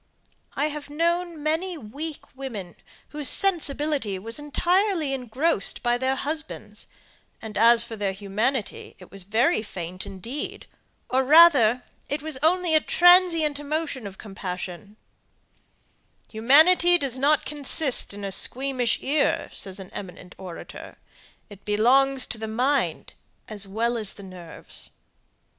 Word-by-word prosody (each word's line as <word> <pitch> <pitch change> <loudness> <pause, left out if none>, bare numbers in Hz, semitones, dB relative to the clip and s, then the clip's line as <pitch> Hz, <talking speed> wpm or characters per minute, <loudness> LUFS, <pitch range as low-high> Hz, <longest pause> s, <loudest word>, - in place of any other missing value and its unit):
I 295 +3 0
have 300 -1 -8
known 335 +1 -2
many 330 +4 -1
weak 290 +5 -8
women 225 -10 -7 0.3
whose 295 -2 0
sensibility 295 - +1
was 225 +7 -4
entirely 345 +1 0
engrossed 260 +1 -1
by 240 0 +1
their 260 +1 0
husbands; 310 +3 -5 0.5
and 220 -2 -9
as 230 +2 +6
for 235 -1 -8
their 205 -2 -2
humanity, 205 +5 -3
it 185 - -16
was 195 -1 -3
very 230 - +1
faint 185 -2 -8
indeed, 200 +9 -7 0.4
or 260 +1 +1
rather 265 -6 +6 0.3
it 290 +1 -3
was 310 -4 -3
only 345 +1 +2
a 310 - +5
transient 345 -5 +4
emotion 290 -5 -4
of 190 -1 -11
compassion, 195 0 -8 1.3
"Humanity 315 +10 +5
does 265 -5 -1
not 295 +3 +2
consist 290 -2 +3
in 205 0 -8
a 195 - -4
squeamish 255 +3 +1
ear," 285 +1 0
says 190 0 -4
an 190 - -11
eminent 180 -2 -10
orator. 180 -3 -10 0.5
"It 200 -2 -15
belongs 260 +6 +3
to 225 - -5
the 220 - -5
mind 255 +6 -1 0.3
as 205 -3 -4
well 230 +4 -1
as 210 -3 0
the 200 - -12
nerves." 180 -3 -8
260 Hz, 130 wpm, -24 LUFS, 210-305 Hz, 1.3 s, as